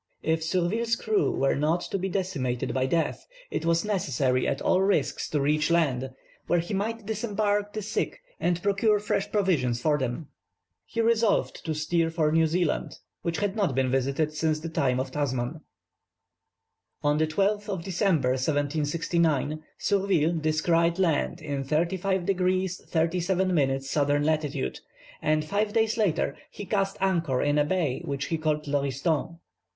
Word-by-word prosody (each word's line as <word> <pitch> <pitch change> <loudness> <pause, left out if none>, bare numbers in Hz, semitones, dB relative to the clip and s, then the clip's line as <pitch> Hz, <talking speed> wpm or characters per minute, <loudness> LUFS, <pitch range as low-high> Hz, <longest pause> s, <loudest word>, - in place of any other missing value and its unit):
If 160 0 +1
Surville's 190 +8 +1
crew 410 - +1
were 135 - +1
not 155 +5 +1
to 195 - -3
be 190 +1 -2
decimated 135 -10 -2
by 130 0 +1
death, 165 +4 -1 0.2
it 165 - -2
was 170 +3 +2
necessary 135 - 0
at 135 - -1
all 185 - +2
risks 150 -8 +1
to 150 - 0
reach 150 +2 +2
land, 135 -7 +1 0.4
where 175 - +3
he 170 +4 -2
might 220 +2 -2
disembark 205 -1 -1
the 215 - -4
sick, 215 - -2 0.2
and 175 0 0
procure 205 +2 +3
fresh 205 0 -1
provisions 155 - +1
for 150 +3 +1
them. 130 +4 -3 0.6
He 230 - -1
resolved 230 -1 +1
to 160 -2 -1
steer 165 +2 +1
for 160 -2 +1
New 160 0 +4
Zealand, 170 0 -1 0.2
which 170 -1 -2
had 205 -1 -1
not 195 - 0
been 130 -1 +1
visited 140 +4 0
since 155 0 0
the 165 +2 -5
time 130 -5 +1
of 130 0 -3
Tasman. 135 +1 -2 1.4
On 145 +1 +2
the 155 - +2
12th 205 +6 0
of 190 -4 -3
December, 175 -7 +1
1769, 150 +2 0 0.2
Surville 190 -5 +2
descried 165 +2 +1
land 170 -1 +1
in 140 -2 -3
35 175 +5 0
degrees 185 -1 0
37 180 +3 +1
minutes 135 -3 0
S. 145 -2 +2
lat., 145 - 0 0.4
and 155 0 +1
five 205 +5 0
days 225 -1 +2
later 200 -8 +1
he 205 - -8
cast 195 -1 0
anchor 170 -9 +1
in 145 0 +2
a - - +4
bay 155 -4 0
which 140 -3 -3
he 165 +1 -2
called 155 -1 0
Lauriston. 145 +3 -1
165 Hz, 155 wpm, -27 LUFS, 145-190 Hz, 1.4 s, New